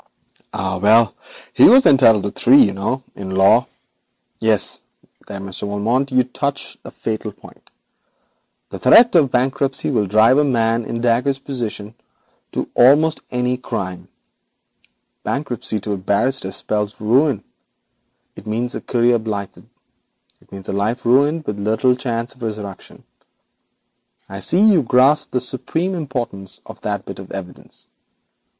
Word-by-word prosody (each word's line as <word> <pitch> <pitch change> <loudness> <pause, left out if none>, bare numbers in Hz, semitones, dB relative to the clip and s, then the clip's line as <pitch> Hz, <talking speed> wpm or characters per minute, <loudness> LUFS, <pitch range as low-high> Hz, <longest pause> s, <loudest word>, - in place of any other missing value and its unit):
'Ah, 95 - -3
well, 110 +2 +4 0.4
he - - +6
was 260 +2 +6
entitled 115 -7 +5
to 100 - -3
three, 130 +4 +4
you 100 - 0
know, 105 +7 -3
in 95 -1 -8
law. 95 +1 +4 0.7
Yes, 110 -3 +2 0.5
there, 100 -1 -7
Monsieur 95 +1 -6
Valmont, 115 +7 -1
you 130 0 +3
touch 140 +3 -4
the - - -10
fatal 110 -1 -5
point. 100 - -18 1.0
The - - -8
threat 230 - +6
of 155 -6 +4
bankruptcy 135 +3 -1
will 105 -6 0
drive 110 +7 +4
a - - +4
man 115 -4 0
in 115 +1 -4
Dacre's 125 +3 +1
position 115 -6 -6 0.6
to - - -3
almost 150 +6 +4
any 125 0 -1
crime. 100 -8 -6 1.2
Bankruptcy 125 -5 -3
to 105 +1 -3
a - - -3
barrister 100 +3 -1 0.2
means 105 -1 -1
ruin. 125 +2 +2 0.9
It - - -13
means 120 +3 -2
a - - -5
career 120 0 +1
blighted; 105 -3 -6 0.7
it - - -28
means 95 -1 -10
a - - -3
life 110 +5 -2
buried, 145 +6 +2
with 105 -1 -4
little 110 +5 +1
chance 120 -1 -4
of 130 - -24
resurrection. 105 -4 -7 1.2
I 95 0 -8
see, 175 - +1
you 210 -6 +5
grasp 130 +4 +3
the 125 - -2
supreme 160 +8 -3
importance 125 - -5
of - - -12
that 100 -2 -3
bit 95 - -9
of 95 - -11
evidence. 90 -2 -8
115 Hz, 145 wpm, -19 LUFS, 105-130 Hz, 1.2 s, he